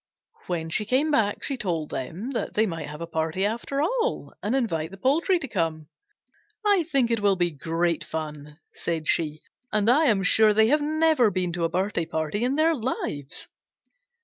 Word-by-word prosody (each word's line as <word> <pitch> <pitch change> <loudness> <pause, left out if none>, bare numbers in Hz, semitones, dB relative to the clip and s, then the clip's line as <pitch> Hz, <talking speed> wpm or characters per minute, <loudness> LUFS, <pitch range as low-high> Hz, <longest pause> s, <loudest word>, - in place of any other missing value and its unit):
When 165 -2 -3
she 210 - 0
came 265 +8 +2
back 210 -7 +1
she 275 - -2
told 170 -8 -2
them 180 - -4
that 250 - -3
they 220 - +4
might 165 -5 -4
have 150 +2 -8
a - - -2
party 160 +3 -1
after 235 +6 -1
all 475 +7 -1
and 215 +5 0
invite 165 -12 -1
the 195 - -11
poultry 310 - +2
to 310 -5 -4
come. 160 - -2 0.8
"I 405 -3 +4
think 270 -7 +1
it 230 - +2
will 200 -1 +3
be 175 -1 0
great 165 +3 -1
fun," 150 -2 -6 0.2
said 165 -2 -3
she, 155 -2 +1 0.3
"and 215 +2 +3
I 305 +5 +4
am 210 -8 +3
sure 215 +2 +5
they 220 +1 +5
have 300 +2 +3
never 310 -5 +3
been 180 -3 -2
to 170 -1 0
a - - 0
birthday 180 -1 -1
party 160 +6 -2
in 255 +3 +1
their 320 +2 +3
lives." 215 - -3
200 Hz, 190 wpm, -25 LUFS, 165-260 Hz, 0.8 s, sure